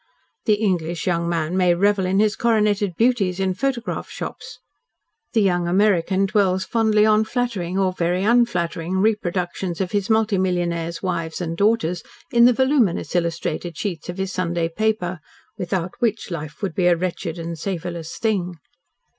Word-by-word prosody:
The 215 - +4
English 175 -6 -1
young 170 -2 0
man 165 0 -1
may 180 -2 +3
revel 200 0 +2
in 190 +2 +2
his 215 0 +3
coroneted 210 -5 +1
beauties 210 -6 +1
in 190 -1 +1
photograph 250 +2 -2
shops, - - -7 0.8
the 220 -3 +3
young 175 -3 +1
American 190 0 +2
dwells 190 -2 +1
fondly 220 -2 +3
on 215 0 +4
flattering, 220 -7 -2
or 190 -1 +1
very 180 +1 0
unflattering, 185 -6 +1
reproductions 185 -3 -1
of 190 -2 -2
his 205 -1 -1
multi 220 -3 +2
millionaires' 170 -2 -1
wives 170 -3 -2
and 165 -2 -3
daughters 190 -4 +1 0.3
in 235 0 +6
the 250 - +7
voluminous 260 - +1
illustrated 170 0 -2
sheets 175 -6 -4
of 175 - -5
his 190 0 -2
Sunday 170 -2 -1
paper, 185 -2 -1 0.4
without 180 0 -3
which 225 -5 -1
life 155 +1 -6
would 190 - -1
be 180 0 +2
a 175 - +5
wretched 175 -1 -3
and 165 -1 -5
savourless 170 -2 -4
thing. 190 -6 -1
185 Hz, 155 wpm, -22 LUFS, 175-210 Hz, 0.8 s, the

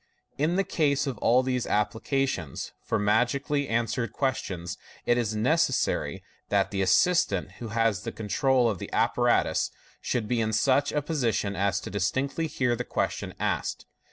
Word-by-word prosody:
In 155 +4 +2
the 195 - +2
case 145 -5 +1
of 130 -7 -4
all 125 +4 +4
these 125 -1 -1
appliances 110 - -1
for - - -1
magically 125 +7 +1
answering 115 +1 0
ques 135 -3 0
tions, 90 +1 -6 0.3
it 120 - +4
is 115 -3 -1
necessary 130 +4 +1 0.3
that 100 -1 +2
the 100 -1 -1
assistant 100 - +3
who 120 - -5
has 110 -3 +1
the - - -4
control 125 +4 +1
of 105 -6 -1
the - - -7
apparatus - - +2 0.3
should 115 -4 -1
be 120 +1 +1
in 110 0 -1
such 140 +5 +3
a 150 -1 -1
position 115 -10 0
as 95 0 +1
to - - -7
distinctly 130 - -1
hear 125 -5 0
the 125 - -3
ques - - -1
tions - - -7
asked. - - -2
120 Hz, 165 wpm, -27 LUFS, 105-135 Hz, 0.3 s, all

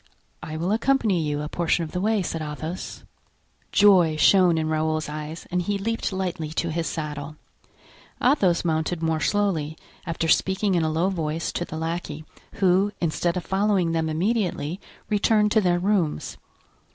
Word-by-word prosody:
"I 155 +1 -6
will 170 +4 -1
accompany 225 -5 +2
you 150 -1 -2
a - - -3
portion 170 +1 0
of 160 - -6
the 180 - -2
way," 215 -1 +1
said 165 -2 -3
Athos. 155 +3 -6 0.7
Joy 180 -6 +5
shone 180 0 +5
in 160 0 0
Raoul's 155 0 0
eyes 150 +2 -6
and 180 0 +1
he 200 +3 -1
leaped 225 +3 -2
lightly 180 -5 -3
to 165 0 -1
his 165 +1 -2
saddle. 150 -1 -5 0.8
Athos 195 - +2
mounted 160 +1 -1
more 160 -1 +1
slowly, 160 -4 0 0.3
after 165 0 -1
speaking 190 +4 +2
in 175 - +2
a 160 - +1
low 165 +4 +1
voice 165 -3 -2
to 175 - -3
the 160 - -7
lackey, 160 -2 -4 0.3
who, 195 +1 +2
instead 170 +1 0
of 175 - -4
following 195 -3 +1
them 160 -1 0
immediately, 180 -2 -1 0.3
returned 210 0 +2
to 220 - +4
their 175 -2 +2
rooms. 180 - 0
170 Hz, 165 wpm, -24 LUFS, 155-195 Hz, 0.8 s, Joy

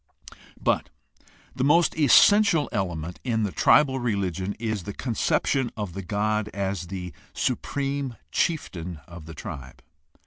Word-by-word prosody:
But - - 0 0.7
the 130 - -1
most 165 +5 +4
essential 165 - +5
element 90 -5 -3
in 115 -3 0
the 100 - -1
tribal 135 +3 +4
religion 100 -4 -2
is 110 -2 -2
the 100 +3 -6
conception 125 +2 0
of 105 -5 -4
the 95 - -5
god 105 +3 -1
as 95 -3 -2
the 90 -2 -6 0.2
supreme 140 -3 -2 0.2
chieftain 90 - -2
of 85 -2 -11
the 80 - -9
tribe. 65 -2 -8
105 Hz, 130 wpm, -25 LUFS, 90-135 Hz, 0.7 s, essential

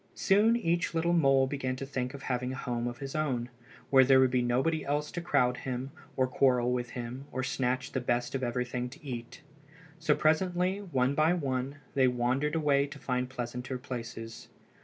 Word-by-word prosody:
Soon 215 +4 +4
each 170 -6 0
little 170 +1 +2
mole 135 -5 +4
began 130 -1 -2
to 135 - -5
think 130 -1 -3
of 140 - -10
having 125 0 -1
a - - -4
home 120 -2 -2
of 120 0 -5
his 135 +1 -6
own, 130 -6 -1 0.4
where 135 -1 +8
there 130 0 +6
would 130 -1 +4
be 125 0 +2
nobody 130 +7 +1
else 145 +1 -1
to 175 - -4
crowd 125 -7 +2
him, 130 +1 -4 0.3
or 130 - +4
quarrel 125 -1 +2
with 120 -1 -1
him, 125 +3 -5
or 130 - -2
snatch 130 0 -1
the 130 - -1
best 120 0 -1
of 135 - -2
everything 125 0 -2
to 150 +4 -14
eat. 120 +4 -7 0.6
So 155 -2 +3
presently, 180 +4 +1
one 135 -9 0
by 155 +4 +3
one, 135 -3 -2 0.2
they 130 -2 +4
wandered 125 +5 0
away 145 -3 +2
to 145 - -10
find 125 -2 -2
pleasanter 125 0 -4
places. 115 -2 -7
130 Hz, 190 wpm, -30 LUFS, 125-150 Hz, 0.6 s, where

